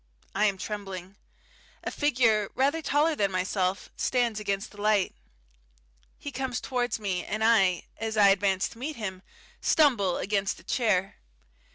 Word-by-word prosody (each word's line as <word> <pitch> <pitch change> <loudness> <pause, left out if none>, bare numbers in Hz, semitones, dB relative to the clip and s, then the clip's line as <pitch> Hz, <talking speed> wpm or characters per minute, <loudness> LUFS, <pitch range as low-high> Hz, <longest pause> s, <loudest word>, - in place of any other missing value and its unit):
I 210 +2 +2
am 200 -2 +1
trembling. 195 -2 -6 0.7
A - - -3
figure 235 -8 +2
rather 280 +5 +2
taller 305 +2 +2
than 200 -7 +1
myself 185 +1 -1
stands 240 -4 0
against 200 0 -2
the 205 - -11
light. 210 -2 +2 1.0
He 285 - -7
comes 260 -2 -3
towards 245 -3 -2
me, 190 -4 -2
and 215 +1 -3
I, 195 -6 +4 0.2
as 220 0 -3
I 200 -1 +7
advance 195 -1 +2
to 230 - -14
meet 295 +4 -4
him, 190 -5 -5 0.4
stumble 230 - +3
against 200 0 -1
a - - -17
chair. 195 -6 0
210 Hz, 150 wpm, -28 LUFS, 195-245 Hz, 1.0 s, I